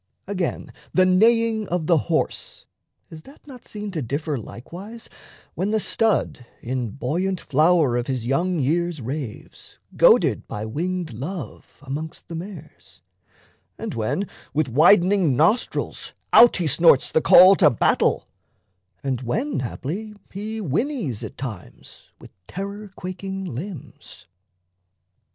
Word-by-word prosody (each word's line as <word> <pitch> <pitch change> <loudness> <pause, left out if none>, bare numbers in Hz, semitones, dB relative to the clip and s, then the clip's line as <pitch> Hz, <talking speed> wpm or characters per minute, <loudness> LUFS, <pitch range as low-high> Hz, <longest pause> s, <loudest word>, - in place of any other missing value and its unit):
Again 190 -3 -3 0.2
the 185 - +5
neighing 220 +3 +3
of 175 -2 -2
the 165 -1 +4
horse, 160 - -2 0.5
is 160 -1 -10
that 275 - -18
Not 260 -4 -13
seen 210 -1 -6
to 165 -4 -3
differ 145 +5 -3
likewise, 180 - -9 0.4
when 190 +4 -2
the 220 +1 +1
stud 220 - 0 0.2
In 125 -1 -3
buoyant 170 - -2
flower 155 -2 +3
of 120 - -2
his 130 -4 -3
young 170 +8 0
years 165 +3 0
raves, 130 -1 -7 0.2
Goaded - - +4
by 105 +1 -5
winged 170 +5 -3
Love, 140 - -7
amongst 150 +6 -7
the - - -7
mares, 160 - -10 0.8
And - - -5
when 115 - -2 0.3
with 150 -3 +1
widening 175 - +4
nostrils 175 +11 0 0.2
out 240 0 +8
he 175 - -1
snorts 155 -1 +4
The 160 - +2
call 185 +4 +8
to - - +6
battle, 115 - +1 0.8
and 130 -3 -2
when 235 - -2
haply 175 - -5 0.2
he 215 +3 -5
Whinnies 180 - -2
at 110 - -8
times 110 - -9
with - - -15
terror 200 +2 -6
quaking 190 +1 -6
limbs? 170 - -9
170 Hz, 130 wpm, -23 LUFS, 135-195 Hz, 0.8 s, out